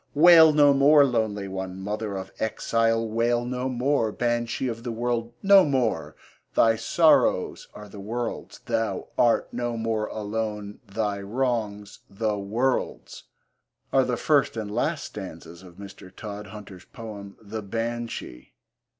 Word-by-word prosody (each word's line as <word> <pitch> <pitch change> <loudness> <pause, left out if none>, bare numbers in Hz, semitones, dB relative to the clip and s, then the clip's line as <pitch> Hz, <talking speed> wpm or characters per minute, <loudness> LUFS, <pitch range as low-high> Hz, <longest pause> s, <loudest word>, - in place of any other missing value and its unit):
Wail 160 0 +8
no 145 -1 +5
more, 140 +1 +6
lonely 110 -5 -1
one, 95 -1 -5
mother 105 +1 -4
of 95 0 -7
exile 115 +1 0
wail 120 +2 0
no 125 +1 -2
more, 125 -2 0
Banshee 120 +2 -1
of 115 -1 -4
the 120 0 -4
world 120 0 -2
no 200 -1 +7
more! 130 -7 -1 0.4
Thy 115 -1 +5
sorrows 155 +8 +2
are 105 - -10
the 100 0 -11
world's, 115 +4 -5
thou - - -2
art 120 -1 +2
no 120 -1 -2
more 110 -1 -1
alone; 105 -1 -4
Thy 100 0 -2
wrongs 105 -2 -2
the 105 +1 -1
world's 115 +6 -2 0.7
are 135 - +5
the 125 -1 -1
first 145 -4 +2
and 105 -2 -4
last - - -1
stanzas 85 +1 -9
of 90 -2 -14
Mr. 95 -1 -11
Todhunter's 100 -2 -9
poem 105 -4 -10
The 110 0 -6
Banshee. 115 - -5
115 Hz, 135 wpm, -25 LUFS, 105-120 Hz, 0.7 s, Wail